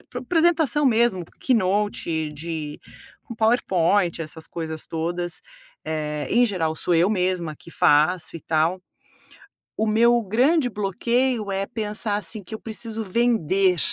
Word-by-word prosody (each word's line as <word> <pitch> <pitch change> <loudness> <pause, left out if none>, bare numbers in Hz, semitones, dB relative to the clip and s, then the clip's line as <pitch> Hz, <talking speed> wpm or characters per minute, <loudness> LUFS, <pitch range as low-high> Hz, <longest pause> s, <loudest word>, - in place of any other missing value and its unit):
apresentação 320 -5 +2
mesmo, 235 -6 +3 0.2
que 260 - +1
note, 185 -7 0
de 155 -1 -5 0.5
um 235 - -6
PowerPoint, 195 -6 +2
essas 160 0 -7
coisas 160 -2 -5
todas, 175 +2 -3 0.4
eh, 150 -1 -3
em 240 +2 +4
geral 165 -7 -1
sou 175 +1 0
eu 175 +4 +4
mesma 180 -5 -1
que 170 - -15
faço 170 +1 +2
e - - -6
tal, 165 +5 0 1.0
o 220 - +1
meu 235 +2 +4
grande 250 - +2
bloqueio 235 +2 0
é 195 0 -1
pensar 210 -1 -2
assim 210 0 -3
que 185 - -11
eu 220 - -5
preciso 225 0 -4
vender, 195 -4 +2
195 Hz, 135 wpm, -23 LUFS, 165-230 Hz, 1.0 s, em